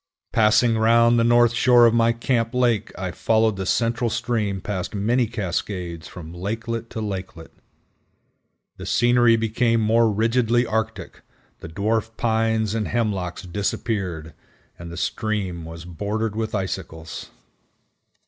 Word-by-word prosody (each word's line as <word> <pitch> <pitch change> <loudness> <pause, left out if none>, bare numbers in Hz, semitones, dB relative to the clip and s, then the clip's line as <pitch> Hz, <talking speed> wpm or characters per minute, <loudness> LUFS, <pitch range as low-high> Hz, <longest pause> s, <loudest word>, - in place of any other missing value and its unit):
Passing 115 +1 +3
round 115 +1 +4
the - - +3
north 120 0 +4
shore 120 0 +5
of 115 - +4
my 115 0 +4
camp 115 0 -1
lake 120 -4 +1
I 95 -1 -3
followed 110 +2 +1
the 95 -1 -4
central 115 +2 +1
stream 110 -4 -1
past 95 +1 -4
many 115 +4 +1
cascades 90 -5 -4
from 80 -2 -10
lakelet 115 +5 -4
to 110 - -5
lakelet. 95 -5 -6 1.3
The - - -8
scenery 120 -1 +4
became 115 +1 +1
more 110 +1 +3
rigidly 115 +3 +2
arctic, 110 -1 -3 0.4
the 80 - -9
Dwarf 110 +5 -1
Pines 110 -2 +1
and 110 -2 -1
Hemlocks 100 -7 -2
disappeared, 90 -3 -3 0.5
and 85 0 -8
the 85 - -8
stream 95 -6 -2
was 80 0 -9
bordered 105 +5 -3
with 110 -1 -2
icicles. 80 -5 -5
110 Hz, 130 wpm, -23 LUFS, 95-115 Hz, 1.3 s, shore